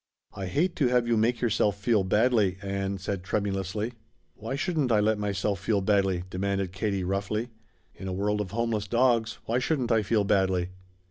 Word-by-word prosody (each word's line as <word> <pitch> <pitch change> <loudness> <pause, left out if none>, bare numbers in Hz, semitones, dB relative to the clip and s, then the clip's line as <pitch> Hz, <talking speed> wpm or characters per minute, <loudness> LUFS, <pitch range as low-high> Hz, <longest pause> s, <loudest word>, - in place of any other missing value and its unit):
"I 95 -1 -5
hate 170 - 0
to 140 - +3
have 125 -1 +2
you 120 - +3
make 115 +2 +1
yourself 105 -3 +1
feel 100 0 +2
badly," 105 -1 +2
Ann 100 0 -2
said 95 0 -3
tremulously. 100 +3 -2 0.4
"Why 115 +5 -5
shouldn't 145 -4 0
I 110 - +4
let 105 0 +2
myself 100 -1 -1
feel 100 +2 +1
badly?" 95 -2 +1
demanded 95 0 -2
Katie 100 -1 -1
roughly. 100 +5 -2 0.4
"In 95 - -8
a - - -2
world 105 +2 0
of 100 - -4
homeless 110 0 -1
dogs, 115 0 +2
why 120 +2 +1
shouldn't 125 -3 0
I 110 -1 +4
feel 105 +1 +1
badly?" 95 -3 +1
105 Hz, 180 wpm, -27 LUFS, 95-115 Hz, 0.4 s, I